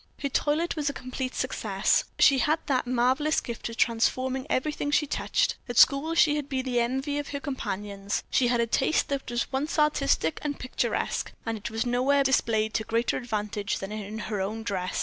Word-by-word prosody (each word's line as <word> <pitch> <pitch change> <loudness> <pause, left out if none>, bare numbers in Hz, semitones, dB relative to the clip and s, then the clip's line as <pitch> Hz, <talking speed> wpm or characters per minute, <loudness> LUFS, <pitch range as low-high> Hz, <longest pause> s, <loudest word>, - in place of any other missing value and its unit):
Her 280 - -3
toilet 300 +5 0
was 295 -2 0
a - - -4
complete 255 0 -5
success; - - +1
she 275 -2 +6
had 305 +5 +2
that 255 -3 0
marvelous 255 +5 +2
gift 235 0 -6
of 230 - -8
transforming 255 +3 +1
everything 290 +2 -1
she 295 +1 +3
touched. - - 0
At 245 - -4
school 295 +4 +5
she 300 -3 +4
had 290 -1 -4
been 265 -2 -2
the 245 -2 +1
envy 265 +5 -1
of 290 - -5
her 280 - -4
companions; 205 -8 -4
she 250 - +3
had 240 0 +2
a - - +2
taste 265 +7 +1
that 275 -1 -3
was 240 0 0
at - - -16
once 290 +5 -1
artistic 280 - +2
and 290 -1 -3
picturesque, 255 - -2
and 225 0 -1
it 220 +2 -5
was 225 +2 -2
nowhere 260 +3 +2
displayed 220 -5 +1
to 220 - 0
greater 230 +2 0
advantage 210 -4 -2
than 195 +1 -6
in 215 0 -5
her 210 -2 -3
own 215 +4 -3
dress. 190 -4 -2
255 Hz, 200 wpm, -27 LUFS, 225-285 Hz, -, she